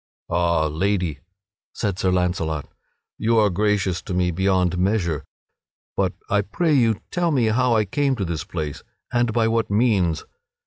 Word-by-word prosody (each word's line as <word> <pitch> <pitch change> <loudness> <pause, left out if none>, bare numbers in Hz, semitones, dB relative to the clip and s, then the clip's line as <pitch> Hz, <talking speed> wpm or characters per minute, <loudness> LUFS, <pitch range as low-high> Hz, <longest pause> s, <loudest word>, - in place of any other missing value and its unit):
"Ha, 85 -2 +2
Lady," 85 -1 -1 0.6
said 100 -2 -2
Sir 95 - +2
Launcelot, 90 -4 0 0.5
"you 115 +1 +2
are 105 -2 +4
gracious 95 -1 +1
to 90 - -5
me 90 -1 +2
beyond 90 0 +1
measure! 90 -6 0 0.7
But - - +1
I 105 +1 +2
pray 160 - 0
you 115 -6 +3
tell 175 -1 +1
me 130 -7 +2
how 125 +1 +2
I 110 -1 +2
came 135 +7 0
to 100 -5 -2
this 85 -2 -3
place 75 -4 -5 0.3
and 120 -1 +2
by 115 0 +2
what 115 0 0
means? 100 -7 +2
100 Hz, 160 wpm, -23 LUFS, 90-115 Hz, 0.7 s, are